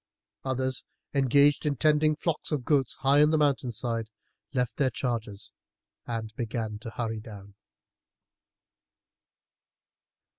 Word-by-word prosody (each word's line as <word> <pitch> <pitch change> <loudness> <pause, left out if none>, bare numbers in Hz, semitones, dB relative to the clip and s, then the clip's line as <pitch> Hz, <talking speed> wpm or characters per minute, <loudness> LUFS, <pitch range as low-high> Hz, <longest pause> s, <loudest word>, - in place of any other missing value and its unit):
Others, 130 0 -1 0.3
engaged 140 +1 +4
in 150 -2 0
tending 155 +2 +3
flocks 160 +1 -2
of 140 -5 -1
goats 140 -4 +2
high 140 +1 +5
up 150 - +8
on - - +2
the 155 - +3
mountain 140 -4 +2
side, 115 -1 -3 0.4
left 125 -3 -1
their 135 -3 +3
charges 115 -5 -4 0.5
and 115 -2 -4
began 110 -2 -3
to 115 - -7
hurry 115 -1 -3
down. 100 -3 -11
130 Hz, 120 wpm, -28 LUFS, 115-145 Hz, 0.5 s, up